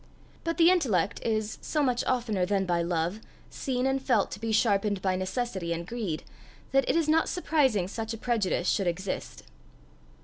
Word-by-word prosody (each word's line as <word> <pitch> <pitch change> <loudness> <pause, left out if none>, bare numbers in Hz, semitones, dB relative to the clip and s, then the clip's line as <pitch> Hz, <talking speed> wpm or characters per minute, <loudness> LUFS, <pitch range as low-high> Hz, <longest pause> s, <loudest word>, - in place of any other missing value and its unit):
But 330 0 -2
the 340 +1 +7
intellect 225 - +1
is, 220 -1 -1
so 300 -2 0
much 250 -3 +1
oftener 230 -7 0
than 195 +1 +1
by 175 -2 +1
love, 170 +3 -1 0.3
seen 255 -2 -2
and 270 0 +1
felt 235 -6 +2
to 200 - -6
be 225 +1 -2
sharpened 205 -2 +2
by 185 0 0
necessity 185 -2 -2
and 170 0 -4
greed, 200 -7 -3 0.5
that 270 -1 +2
it - - +2
is 330 -2 +2
not 315 +1 +3
surprising 270 - +1
such 220 +2 -4
a 225 - -4
prejudice 215 -6 0
should 195 - +1
exist. 185 +2 -3
215 Hz, 175 wpm, -28 LUFS, 185-255 Hz, 0.5 s, the